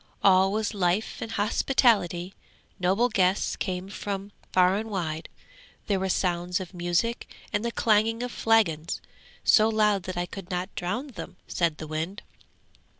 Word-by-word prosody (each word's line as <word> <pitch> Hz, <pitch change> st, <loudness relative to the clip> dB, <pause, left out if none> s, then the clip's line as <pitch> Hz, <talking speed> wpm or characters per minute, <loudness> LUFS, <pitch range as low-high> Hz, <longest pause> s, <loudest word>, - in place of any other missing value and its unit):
All 190 Hz, 0 st, +5 dB
was 215 Hz, +1 st, -1 dB
life 190 Hz, +1 st, 0 dB
and 225 Hz, -, -4 dB
hospitality; 205 Hz, -5 st, +2 dB, 0.5 s
noble 190 Hz, +7 st, +3 dB
guests 190 Hz, -4 st, +1 dB
came 185 Hz, -1 st, -3 dB
from 200 Hz, 0 st, -5 dB, 0.2 s
far 185 Hz, 0 st, +4 dB
and 220 Hz, +1 st, -4 dB
wide; 165 Hz, -6 st, -3 dB, 0.6 s
there 200 Hz, -2 st, +1 dB
were 190 Hz, 0 st, -1 dB
sounds 180 Hz, 0 st, 0 dB
of 185 Hz, 0 st, -8 dB
music 175 Hz, +7 st, -1 dB, 0.2 s
and 205 Hz, -, 0 dB
the 235 Hz, -, -1 dB
clanging 225 Hz, +1 st, +2 dB
of 245 Hz, -, -4 dB
flagons, 180 Hz, -11 st, +2 dB, 0.4 s
so 215 Hz, 0 st, +5 dB
loud 210 Hz, -2 st, +3 dB
that 185 Hz, -1 st, -5 dB
I 175 Hz, -, 0 dB
could 185 Hz, 0 st, -9 dB
not 180 Hz, +1 st, -3 dB
drown 220 Hz, +11 st, -3 dB
them!' 180 Hz, -5 st, -9 dB
said 170 Hz, -3 st, 0 dB
the -, -, -6 dB
wind. 160 Hz, +6 st, -4 dB
190 Hz, 150 wpm, -27 LUFS, 180-215 Hz, 0.6 s, All